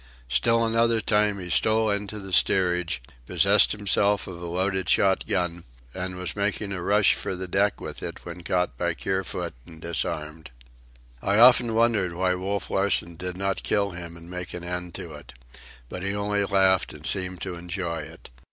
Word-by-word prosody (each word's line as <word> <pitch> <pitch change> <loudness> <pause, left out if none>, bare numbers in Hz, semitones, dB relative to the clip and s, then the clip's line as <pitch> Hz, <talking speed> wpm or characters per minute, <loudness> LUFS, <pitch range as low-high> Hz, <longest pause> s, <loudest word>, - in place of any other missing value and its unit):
Still 115 - +2
another 115 0 +2
time, 105 -2 +2
he 90 -1 -6
stole 110 +2 +3
into 100 +1 -3
the 95 -2 -8
steerage, 90 -8 +2 0.2
possessed - - +4
himself 100 0 +2
of 85 -2 -9
a 85 - -5
loaded 95 +2 -1
shot 95 -1 +3
gun, 90 -2 -1 0.3
and 90 0 -4
was 90 0 -4
making 100 0 -1
a 95 -3 -4
rush 105 +3 +4
for - - -4
the 95 0 -5
deck 100 +3 +1
with - - -7
it - - -7
when 85 0 -8
caught 90 +1 -1
by 85 -1 0
Kerfoot 95 -2 -3
and 80 -2 -12
disarmed. 80 -1 -4 0.7
I 100 +1 +1
often 120 -1 +6
wondered 110 -7 +2
why 90 +1 +1
Wolf 95 +2 -3
Larsen 95 -3 +2
did 90 +2 -5
not 95 0 -1
kill 100 -1 0
him 85 -1 -8
and 85 0 -13
make 90 0 -6
an 90 - -7
end 90 -1 -4
of 85 - -8
it. 75 -1 -11 0.5
But 90 - -7
he 95 +2 -2
only 100 0 0
laughed 95 -2 +2
and - - -12
seemed 90 -2 0
to 95 - -4
enjoy 85 -1 -4
it. 75 - -10
95 Hz, 180 wpm, -25 LUFS, 90-100 Hz, 0.7 s, often